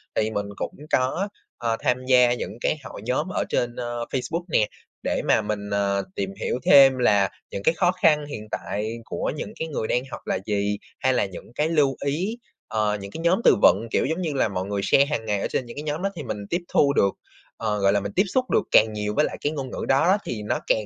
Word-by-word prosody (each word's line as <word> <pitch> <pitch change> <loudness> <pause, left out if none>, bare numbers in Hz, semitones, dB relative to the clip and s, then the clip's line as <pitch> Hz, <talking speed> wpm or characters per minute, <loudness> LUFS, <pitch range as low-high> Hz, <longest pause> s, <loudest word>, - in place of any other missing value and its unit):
Thì 110 0 +1
mình 100 -1 -2
cũng - - -4 0.2
có, 155 +11 +1 0.3
ờ, 115 -1 -1
tham 125 +1 0
gia 125 -2 +5
những 115 -2 -5
cái - - +1
hội - - -9
nhóm 130 +7 0
ở - - -1
trên, 120 -1 0
ơ, 120 -1 -4
Facebook 165 +6 -2
nè 110 -7 +3 0.4
để - - 0
mà - - +4
mình, 105 -1 -4
ờ, 100 -1 +1
tìm 95 0 -3
hiểu 125 - -1
thêm 135 -2 +8
là 100 -6 +3 0.2
những 100 - -5
cái 160 - +4
khó 175 +2 +2
khăn 155 -5 +3
hiện 110 -7 -7
tại 110 +3 -3
của - - -2
những 210 +8 -6
cái 160 - -2
người 125 -8 -3
đang 125 - +1
học - - -6
là - - 0
gì, 105 -1 0 0.2
hay 130 - +2
là 125 - +2
những 95 +4 -10
cái 155 +2 +1
lưu 145 -5 +2
ý, 185 +11 -1 0.3
ờ, 105 -1 0
những 100 0 -8
cái 165 - -6
nhóm 180 +6 +2
từ - - +6
vựng, 105 +6 +5
kiểu - - +2
giống 160 +6 -1
như 160 -4 -1
là, 130 - +2
mọi 95 -2 -3
người 100 0 -2
share 140 - +5
hằng 140 -6 -3
ngày 105 -2 0
ở - - 0
trên 130 - -2
những 120 - -10
cái 150 - -4
nhóm 150 +2 -3
đó 195 - 0
á - - -13
thì 155 - -5
mình 105 -4 -5
tiếp 175 +1 0
thu 140 -1 +3
được, 100 -6 +3 0.5
ờ, 110 -2 -1
gọi 100 0 +3
là, 100 - +3
mình 100 0 -5
tiếp 195 - +5
xúc 255 +6 +1
được 215 - +3
càng 110 0 +5
nhiều 105 0 -2
với 150 - +4
lại - - -5
cái 145 - 0
ngôn 140 -4 -5
ngữ - - -4
đó 170 +9 +4
thì 105 -3 -4
nó - - -1
càng 110 -1 +2
120 Hz, 255 wpm, -24 LUFS, 105-150 Hz, 0.5 s, thêm